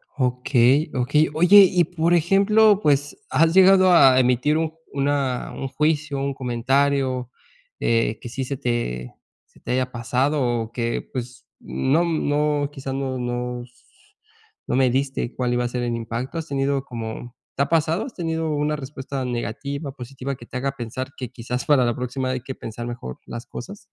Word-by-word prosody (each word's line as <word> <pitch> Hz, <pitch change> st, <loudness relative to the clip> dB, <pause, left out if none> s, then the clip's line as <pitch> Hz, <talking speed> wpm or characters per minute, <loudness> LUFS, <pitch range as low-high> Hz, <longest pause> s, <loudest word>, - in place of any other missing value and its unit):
Okey, 125 Hz, +3 st, +2 dB
Okey. 145 Hz, +5 st, +2 dB
Oye, 185 Hz, +5 st, +8 dB
y, 180 Hz, -1 st, +4 dB
por 170 Hz, +1 st, 0 dB
ejemplo, 200 Hz, +5 st, +4 dB
pues 145 Hz, 0 st, +1 dB
¿has 165 Hz, +1 st, +3 dB
llegado 185 Hz, 0 st, +6 dB
a 135 Hz, -7 st, +7 dB
emitir 130 Hz, +5 st, +2 dB
un 160 Hz, -1 st, -1 dB, 0.2 s
una 140 Hz, -2 st, -1 dB
un 135 Hz, -, -4 dB
juicio, 150 Hz, 0 st, 0 dB
un 140 Hz, 0 st, -1 dB
comentario 130 Hz, 0 st, 0 dB, 0.5 s
eh, 115 Hz, -1 st, +1 dB
que 120 Hz, -, -7 dB
sí 130 Hz, +2 st, -4 dB
se 140 Hz, 0 st, -4 dB
te 65 Hz, -, -3 dB, 0.3 s
se -, -, -24 dB
te -, -, -5 dB
haya 130 Hz, 0 st, 0 dB
pasado? 125 Hz, +5 st, 0 dB, 0.2 s
O 110 Hz, 0 st, -6 dB
que 115 Hz, -1 st, -3 dB
pues 125 Hz, 0 st, -6 dB
no 145 Hz, +6 st, +1 dB
no, 150 Hz, -3 st, 0 dB
¿quizás 135 Hz, -1 st, -6 dB
no 135 Hz, -1 st, -2 dB
no, 125 Hz, 0 st, -3 dB
no 120 Hz, -, -7 dB
s 120 Hz, 0 st, -20 dB, 0.8 s
no -, -, 0 dB
mediste 130 Hz, -1 st, 0 dB
cuál 125 Hz, -1 st, 0 dB
iba 120 Hz, 0 st, 0 dB
a -, -, +1 dB
ser 120 Hz, 0 st, -3 dB
el 120 Hz, -1 st, -1 dB
impacto? 115 Hz, +7 st, -4 dB
¿Has 160 Hz, -, -6 dB
tenido 140 Hz, -1 st, 0 dB
como 115 Hz, 0 st, -7 dB, 0.2 s
te 140 Hz, -, -1 dB
ha -, -, -4 dB
pasado? 165 Hz, +4 st, +1 dB
¿Has 260 Hz, -, -9 dB
tenido 160 Hz, -2 st, -2 dB
una 150 Hz, +1 st, 0 dB
respuesta 135 Hz, -1 st, -5 dB
negativa, 135 Hz, +4 st, -4 dB
positiva 135 Hz, +1 st, -6 dB
que 120 Hz, -, -13 dB
te 125 Hz, -, -5 dB
haga 135 Hz, +2 st, -1 dB
pensar 130 Hz, +2 st, -5 dB
que 125 Hz, -3 st, -5 dB
quizás 125 Hz, 0 st, -5 dB
para 140 Hz, -4 st, +4 dB
la 120 Hz, -1 st, 0 dB
próxima 130 Hz, +1 st, -3 dB
hay 130 Hz, -1 st, -2 dB
que 130 Hz, +1 st, -7 dB
pensar 120 Hz, +1 st, -7 dB
mejor 115 Hz, -, -7 dB
las 120 Hz, 0 st, -7 dB
cosas? 200 Hz, +13 st, -8 dB
135 Hz, 180 wpm, -23 LUFS, 125-150 Hz, 0.8 s, Oye